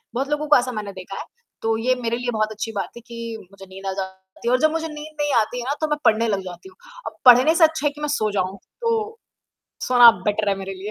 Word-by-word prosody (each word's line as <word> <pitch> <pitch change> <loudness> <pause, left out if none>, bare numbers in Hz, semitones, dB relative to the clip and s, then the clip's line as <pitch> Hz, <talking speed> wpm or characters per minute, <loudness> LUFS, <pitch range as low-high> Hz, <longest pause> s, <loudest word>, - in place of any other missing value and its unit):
बहुत 270 +3 -1
लोगों 295 +1 -1
को 295 - +7
ऐसा 255 +1 -1
मैंने 210 -3 -5
देखा 190 +1 -8
है। - - -6 0.4
तो 225 0 +1
ये 255 +3 +1
मेरे 235 0 -1
लिए 245 0 -2
बहुत 215 -1 -1
अच्छी 220 +1 -5
बात 195 -4 -3
थी 235 - -10
कि 230 -1 -6
मुझे 195 -1 -13
नींद 190 +1 -12
आ - - 0
जाती 190 +3 -10
है - - +3
और 255 - +3
जब 310 0 +4
मुझे 325 0 -2
नींद 305 0 -9
नहीं 290 -1 0
आती 245 +3 -4
है - - -4
ना, 285 - +1
तो 310 - +1
मैं 300 0 -1
पढ़ने 225 +1 +4
लग 200 -3 0
जाती 180 - -10
हूँ 375 - -21 0.3
और - - -6
पढ़ने 255 +6 +7
से 330 - +4
अच्छा 315 -2 +3
है - - 0
कि 295 - -12
मैं 300 - -1
सो 215 -1 0
जाऊँ, 190 -1 -2 0.2
तो 450 -1 -1 0.7
सोना 245 -2 +8
बेटर 210 0 0
है 195 - +2
मेरे 195 0 -6
लिए 195 +3 -7
235 Hz, 275 wpm, -22 LUFS, 200-295 Hz, 0.7 s, सोना